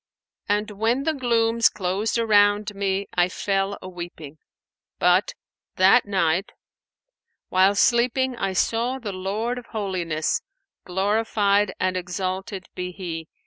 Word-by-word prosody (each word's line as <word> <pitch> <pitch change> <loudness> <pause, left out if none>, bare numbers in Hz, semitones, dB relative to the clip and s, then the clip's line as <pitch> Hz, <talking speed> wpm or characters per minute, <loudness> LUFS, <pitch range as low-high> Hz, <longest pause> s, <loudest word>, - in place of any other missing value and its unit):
[FN#497] 205 - +4
And 210 +1 -5
when 225 +6 0
the 320 - +1
glooms 230 -4 +2
closed 195 +4 -1
around 205 -2 +3
me, 195 0 -1
I 175 0 +2
fell 195 +1 -1
a - - -7
weeping; 170 -4 -9 0.6
but, - - +2 0.4
that 195 +5 +5
night, 185 -1 0 1.0
while 190 +2 +4
sleeping 250 +4 +2
I 195 -4 -2
saw 235 +6 0
the 220 -6 -6
Lord 210 +6 -2
of 245 - -14
Holiness 180 -7 -2 0.4
(glorified 205 +1 +1
and 185 0 0
exalted 185 +2 -4
be 180 0 -4
He!) 170 -4 -6
200 Hz, 125 wpm, -24 LUFS, 185-225 Hz, 1.0 s, that